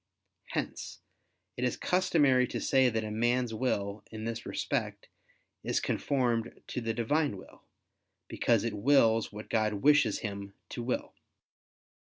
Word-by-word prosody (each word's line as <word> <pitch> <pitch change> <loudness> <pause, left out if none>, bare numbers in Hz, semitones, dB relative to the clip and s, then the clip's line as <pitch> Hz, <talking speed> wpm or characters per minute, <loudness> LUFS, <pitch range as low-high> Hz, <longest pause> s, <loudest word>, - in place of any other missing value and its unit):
Hence - - -4 0.6
it 125 - -3
is 125 - 0
customary 145 -9 +3
to - - -4
say 130 -2 +3
that 110 -1 -1
a 105 - -4
man's 120 +2 +1
will, 105 -4 -1
in 110 -1 -7
this 115 0 -4
respect, - - -3 0.5
is - - +1
conformed 120 -5 -1
to 125 - -3
the 115 0 -1
Divine 130 0 +1
will, - - -14 0.7
because 115 -3 +1
it 115 -2 -2
wills 115 0 +3
what 105 +1 -8
God 110 -1 +1
wishes 140 -1 +4
him 100 -2 -6
to 120 - -5
will. 125 +2 -2
115 Hz, 140 wpm, -30 LUFS, 110-130 Hz, 0.7 s, wishes